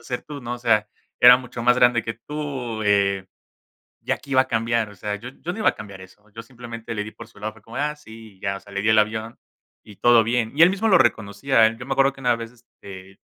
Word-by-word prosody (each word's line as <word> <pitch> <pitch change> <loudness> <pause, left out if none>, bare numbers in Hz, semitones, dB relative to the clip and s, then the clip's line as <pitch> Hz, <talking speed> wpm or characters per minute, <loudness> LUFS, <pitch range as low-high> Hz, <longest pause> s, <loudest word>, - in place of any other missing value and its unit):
hacer 125 +1 -5
tú, 145 -2 -9
¿no? 120 0 -5
O - - -9
sea, 110 -3 +2 0.3
era 125 0 +9
mucho 125 -2 -8
más 125 +1 +4
grande 120 -2 +4
que 115 - -5
tú, 130 -4 -5
eh, 100 -2 +1 0.8
¿ya - - -1
qué 140 - -10
iba 130 0 +5
a - - -12
cambiar? 115 -1 0
O - - -14
sea, 105 +2 -4
yo 120 +5 -9
yo 170 +5 -7
no - - -8
iba 215 - +3
a - - -13
cambiar 100 -3 -10
eso, 105 +3 -18
yo 115 - -6
simplemente 115 -1 -9
le 105 - -2
di 105 +1 -9
por 115 -1 -12
su - - -19
lado, 110 +1 -5
fue 115 - -19
como 115 - -12
de: - - 0
"ah, 150 0 -3
sí", 110 -6 -14
y - - -29
ya, 100 -1 -2
o - - -10
sea, 100 -1 -15
le 100 - -2
di 110 - +2
el 110 - +4
avión 110 +2 -1 0.4
y 105 - -15
todo 120 -1 +5
bien. 115 0 -1
Y 155 - -4
él 175 - +9
mismo 200 +4 -1
lo 190 -4 +6
reconocía, 110 +1 +2
él 115 +1 -3
yo 125 - -9
me 135 - -3
acuerdo 135 0 +3
que 135 - -16
una 120 -2 +2
vez, 115 0 -8
este, 95 -5 -14
115 Hz, 280 wpm, -22 LUFS, 105-125 Hz, 0.8 s, era